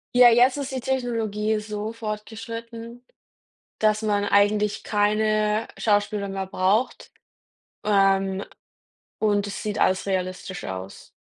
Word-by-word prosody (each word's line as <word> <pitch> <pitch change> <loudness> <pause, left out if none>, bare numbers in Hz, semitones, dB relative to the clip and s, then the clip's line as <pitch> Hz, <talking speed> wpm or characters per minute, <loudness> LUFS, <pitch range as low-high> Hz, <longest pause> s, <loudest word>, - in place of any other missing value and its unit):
Ja, 245 -1 +9
jetzt 250 +4 +4
ist 280 -2 -4
die 260 - -2
Technologie 225 -4 -1
so 210 0 -5
fortgeschritten, 230 +2 -7 0.8
dass 215 0 +2
man 205 -2 +1
eigentlich 205 +1 +2
keine 215 +1 +1
Schauspieler 205 -1 +1
mehr 195 0 -4
braucht, 195 +5 0 0.7
ähm, 195 -1 +2 0.7
und 205 -2 +1
es 200 - -5
sieht 210 -1 -3
alles 185 0 +2
realistisch 185 -1 -3
aus. 95 0 -7
210 Hz, 110 wpm, -24 LUFS, 200-225 Hz, 0.8 s, Ja